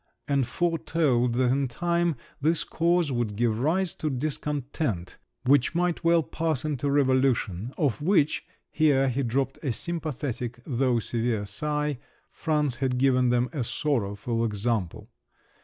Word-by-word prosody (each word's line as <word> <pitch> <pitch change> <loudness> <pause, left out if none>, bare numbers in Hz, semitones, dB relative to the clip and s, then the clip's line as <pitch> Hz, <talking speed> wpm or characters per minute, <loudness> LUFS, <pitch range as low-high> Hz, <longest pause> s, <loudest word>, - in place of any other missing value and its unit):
and 140 -4 +1
foretold 160 -8 +1
that 125 0 +2
in 135 +1 +1
time 170 +5 0 0.3
this 160 +3 +2
cause 170 -2 +1
would 120 -4 -1
give 115 0 +1
rise 170 +7 +1
to 155 - -3
discontent, 140 - -3 0.3
which 140 +3 +3
might 175 -1 0
well 165 0 +4
pass 155 -3 -1
into 145 -2 -1
revolution, 130 -7 +1
of 145 -4 0
which 155 -3 +2 0.3
(here 140 -4 +3
he 130 +2 -1
dropped 135 +2 -1
a 140 - -1
sympathetic 130 -5 -4
though 125 -2 +1
severe 115 -2 -1
sigh) 150 +3 -2 0.3
France 150 -6 0
had 130 -1 0
given 130 -1 +3
them 125 0 +2
a 140 - -1
sorrowful 115 -4 -1
example! 105 -2 -2
135 Hz, 135 wpm, -27 LUFS, 120-155 Hz, 0.3 s, well